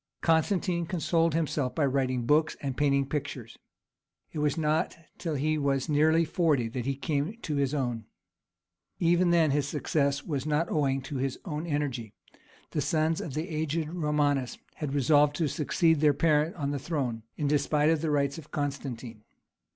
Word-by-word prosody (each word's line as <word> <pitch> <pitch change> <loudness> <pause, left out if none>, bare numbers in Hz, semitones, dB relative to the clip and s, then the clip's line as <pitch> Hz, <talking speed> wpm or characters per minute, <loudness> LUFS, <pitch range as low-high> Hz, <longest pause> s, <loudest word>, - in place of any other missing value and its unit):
Constantine 170 +1 +1
consoled 165 -1 +1
himself 150 -5 -1
by 155 - +2
writing 130 -3 0
books 155 +4 +2
and 135 -3 -3
painting 140 -1 +2
pictures; 135 -5 -5 0.7
it - - -5
was 150 +1 +1
not 160 +2 0 0.2
till 165 -3 -2
he 155 +2 0
was 140 -1 0
nearly 160 +3 +4
forty 155 -7 +1
that 120 +2 -4
he 135 - 0
came 145 - -2
to 150 -3 -2
his 140 -2 +1
own. 120 -5 -2 0.9
Even 175 +1 +3
then 165 -3 +4
his 145 0 +1
success 140 -1 0
was 140 -5 -2
not 155 +3 0
owing 135 -3 +1
to 135 +1 -5
his 135 0 -2
own 155 -1 -4
energy; 135 -8 -2 0.6
the - - -1
sons 160 0 +1
of 145 - -6
the 155 +3 -2
aged 160 -1 -2
Romanus 150 -5 0 0.2
had 145 -2 -4
resolved 145 +1 +4
to 160 -1 0
succeed 160 +2 +2
their 150 -2 +4
parent 155 +1 +2
on 140 -3 -2
the 145 - -2
throne, 130 -7 -2 0.2
in 150 - -2
despite 150 +1 +2
of 160 -2 +1
the 160 - -1
rights 140 0 0
of 150 - -13
Constantine. 130 -6 -4
150 Hz, 170 wpm, -28 LUFS, 140-160 Hz, 0.9 s, nearly